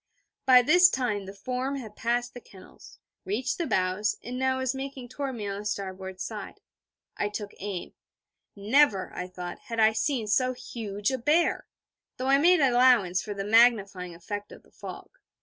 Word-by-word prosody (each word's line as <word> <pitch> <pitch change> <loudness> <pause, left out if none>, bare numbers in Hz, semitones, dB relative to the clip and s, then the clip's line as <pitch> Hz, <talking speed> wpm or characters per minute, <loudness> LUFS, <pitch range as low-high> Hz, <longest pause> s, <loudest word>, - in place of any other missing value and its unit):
By 250 -1 +8
this 355 +6 +6
time, 215 - -2
the 195 - -8
form 255 +6 -3
had 220 -6 -8
passed 240 +1 -1
the 245 - -9
kennels, 190 -4 -16 0.3
reached 240 - -2
the 340 - -1
bows, 185 +3 0
and 250 +2 -5
now 260 0 +1
was 260 0 -1
making 270 -2 -7
toward 270 0 -4
me 210 -3 -5
on 200 0 -4
the 210 - -8
starboard 190 -2 -5
side. - - -6 0.6
I 205 - -1
took 205 -1 -6
aim. 195 -3 -5 0.6
Never, 210 0 +2
I 180 - -5
thought, 180 -1 -7
had 230 -1 -4
I 220 0 +5
seen 245 0 -1
so 255 +4 +2
huge 210 -3 -4
a 260 - -2
bear 315 +7 +2 0.5
though 255 - -4
I 275 0 +5
made 350 +2 +5
allowance 245 -8 +4
for 205 -2 -6
the 195 0 -4
magnifying 200 -6 +3
effect 205 +4 -6
of - - -13
the - - -25
fog. - - -10
225 Hz, 180 wpm, -27 LUFS, 200-260 Hz, 0.6 s, By